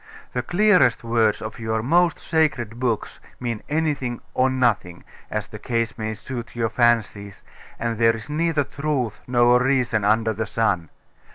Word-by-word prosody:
The - - 0
clearest 180 - +3
words 115 -2 +1
of 110 +2 -7
your 110 -1 -2
most 170 +6 +3
sacred 130 -8 0
books 120 -4 -2 0.2
mean 120 -3 -3
anything 145 -6 -1
or 130 +1 +3
nothing' 120 -9 0 0.3
as - - -3
the - - -10
case 115 -1 -1
may 110 -1 -4
suit 120 +3 -7
your 115 -1 0
fancies; 110 -5 0 0.3
and 115 -1 -3
there 115 0 +4
is 110 - -9
neither 155 0 +1
truth 140 -6 -2
nor 120 0 +4
reason 125 -4 +1
under 110 +2 +2
the 110 +1 -3
sun. 100 -8 0
120 Hz, 155 wpm, -23 LUFS, 110-130 Hz, 0.3 s, there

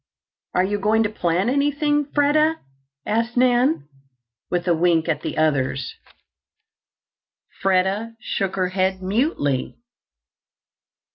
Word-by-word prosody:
"Are 180 - +4
you 205 +2 -1
going 215 +2 +2
to 210 - -1
plant 180 +3 0
anything, 290 +1 +1
Freda?" 295 +2 +2 0.5
asked 230 +3 -1
Nan, 245 - +2 0.6
with 175 0 -2
a 175 - +4
wink 165 -1 +2
at 160 - -1
the - - -5
others. 140 -4 0 1.7
Freda 195 +4 +1
shook 195 -5 -3
her 185 -1 0
head 190 0 -1
mutely. 190 - -1
195 Hz, 110 wpm, -22 LUFS, 175-245 Hz, 1.7 s, Are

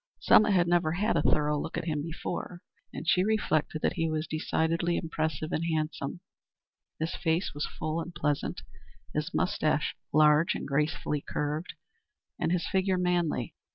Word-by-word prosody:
Selma 215 0 +6
had 180 -4 +3
never 170 -2 +2
had 205 +6 +1
a - - +3
thorough 150 -1 +2
look - - -4
at - - -3
him 155 -3 -1
before, 165 +2 -5 0.3
and 165 - -7
she 180 - +4
reflected 175 -7 0
that - - +2
he 165 0 +1
was 155 0 -1
decidedly 165 +2 0
impressive 160 0 -2
and 160 - 0
handsome. 155 0 -2 0.8
His 160 +1 -2
face 165 +2 0
was 145 +1 -2
full 155 +2 -3
and 175 - -6
pleasant, 150 - -1 0.5
his - - -2
mustache - - 0 0.2
large 155 +2 +5
and - - -4
gracefully 150 +1 0
curved, 150 +6 -3 0.6
and 165 - 0
his 175 -2 0
figure 190 0 +1
manly. 175 - 0
160 Hz, 155 wpm, -29 LUFS, 155-175 Hz, 0.8 s, Selma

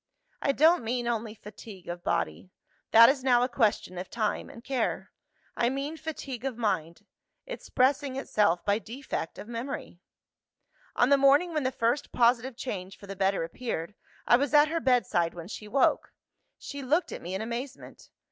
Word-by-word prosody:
"I 275 - +2
don't 320 +2 +4
mean 240 +1 -2
only 225 -2 -2
fatigue 205 -3 -12
of 175 0 -6
body: 185 - -2 0.4
that 230 +1 +9
is 265 0 +1
now 245 -2 +4
a - - +2
question 215 -7 0
of 180 - -7
time 220 -3 -2
and 230 - -12
care. 260 -3 -2 0.4
I 235 - +2
mean 275 +4 -3
fatigue 280 -6 -6
of 265 -4 -3
mind 185 -8 -2 0.4
expressing 275 - 0
itself 210 -9 +1
by 205 +1 +2
defect 230 -5 -6
of - - -9
memory. 235 -6 -6 1.0
"On 245 - +3
the 280 - +6
morning 285 +6 +5
when 305 - 0
the 260 -1 0
first 235 +3 -1
positive 240 +1 +2
change 195 -7 -5
for - - -13
the 195 0 -7
better 195 -1 +1
appeared, 170 0 -4 0.3
I 240 - +6
was 285 +2 0
at 295 0 +6
her 330 +1 -1
bedside 240 - +1
when 170 -1 -8
she 215 -1 -8
woke. 270 +6 +2 0.5
She 285 -1 -7
looked 315 +6 +1
at - - -6
me 180 +2 -5
in 190 - -3
amazement. 240 +4 -7
240 Hz, 175 wpm, -28 LUFS, 205-275 Hz, 1.0 s, that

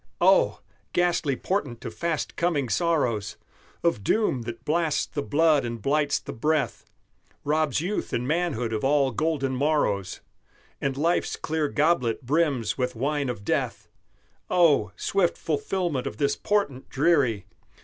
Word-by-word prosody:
Oh! - - +4 0.3
ghastly 175 -6 +1
portent 140 - -3
of - - -5
fast 170 -2 -2
coming 155 -7 0
sorrows! 120 - 0 0.5
Of 170 -12 +1
doom 210 - +1
that 115 +1 -9
blasts 160 -1 +1
the 145 - -4
blood 150 0 +3
and 115 -1 -4
blights 145 +5 +1
the - - -7
breath, 150 +4 -1 0.6
Robs 150 -1 +1
youth 195 +5 -2
and 125 +1 -1
manhood 150 -8 0
of 110 - -2
all 140 -1 +3
golden 135 0 -1
morrows 130 - 0 0.6
And 135 -1 -1
life's 165 +4 +1
clear 155 -1 -1
goblet 140 -6 +1
brims 140 -6 +1
with 125 0 -1
wine 140 +3 -1
of 105 -5 -5
death! - - -2 0.6
Oh! 150 - +4
swift 185 - 0
fulfilment 160 -2 -1
of 105 - -6
this 140 +2 +1
portent 200 -11 -1
dreary! 135 - +2
145 Hz, 140 wpm, -26 LUFS, 125-165 Hz, 0.6 s, Oh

